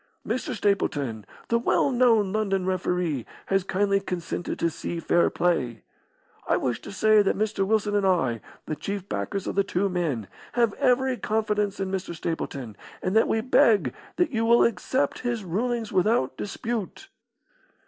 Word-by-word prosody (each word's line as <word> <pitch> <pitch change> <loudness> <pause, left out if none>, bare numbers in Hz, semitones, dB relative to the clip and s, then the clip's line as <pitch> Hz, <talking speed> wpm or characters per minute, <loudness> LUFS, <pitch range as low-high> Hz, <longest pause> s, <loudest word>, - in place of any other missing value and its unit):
Mr. 255 -1 -2
Stapleton, 140 - -1 0.2
the 235 - +3
well 260 +3 +2
known 230 -6 +3
London 195 -3 0
referee, 180 -7 -1 0.2
has 195 -1 +1
kindly 195 +1 +1
consented 180 -2 -4
to 170 - +1
see 170 +2 -4
fair 170 +1 +3
play. 130 -10 0 0.6
I - - +3
wish 120 -3 -2
to - - -9
say 215 +1 +4
that 195 - +1
Mr. 205 -2 0
Wilson 210 -1 +1
and 205 - +2
I, 130 - +1 0.2
the 155 - -3
chief 200 +3 -5
backers 200 -1 -3
of - - -2
the 200 - +2
two 195 0 0
men, 155 - -2 0.3
have 235 -4 +2
every 260 -1 +2
confidence 210 -2 -1
in 190 -1 -2
Mr. 190 -2 -3
Stapleton, 140 -9 -4 0.3
and 185 +3 -1
that 225 - +5
we 220 - +1
beg 210 - +4 0.2
that 355 -3 +1
you 225 -3 0
will 235 +1 +5
accept 235 +6 0
his 240 -3 -2
rulings 225 +5 -2
without 190 - +2
dispute." 230 - -4
200 Hz, 160 wpm, -26 LUFS, 175-220 Hz, 0.6 s, that